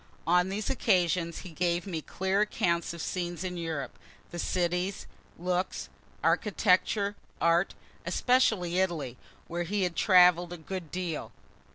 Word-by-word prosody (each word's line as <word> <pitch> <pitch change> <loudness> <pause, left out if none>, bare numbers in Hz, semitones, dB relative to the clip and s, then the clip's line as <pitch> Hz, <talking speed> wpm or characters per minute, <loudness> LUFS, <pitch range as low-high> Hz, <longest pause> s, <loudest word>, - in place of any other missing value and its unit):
On 180 +3 +3
these 205 +2 -3
occasions 175 -6 +1
he 180 - -8
gave 175 +1 0
me 170 -5 -3
clear 190 +5 0
accounts 170 -5 0
of 170 -1 -6
scenes 175 -1 -3
in 180 -1 -3
Europe 160 -6 -4 0.3
the 175 - -5
cities, 180 +2 -1 0.3
looks, 180 +1 -2 0.3
architecture, 205 0 +2 0.2
art, 170 +3 +2 0.3
especially 220 -9 +2
Italy 155 -10 -1 0.3
where 175 +1 -3
he 195 +3 0
had 175 -2 -1
travel'd 180 -3 +5
a - - -6
good 170 +1 -6
deal. 180 -3 -4
180 Hz, 135 wpm, -29 LUFS, 170-190 Hz, 0.3 s, travel'd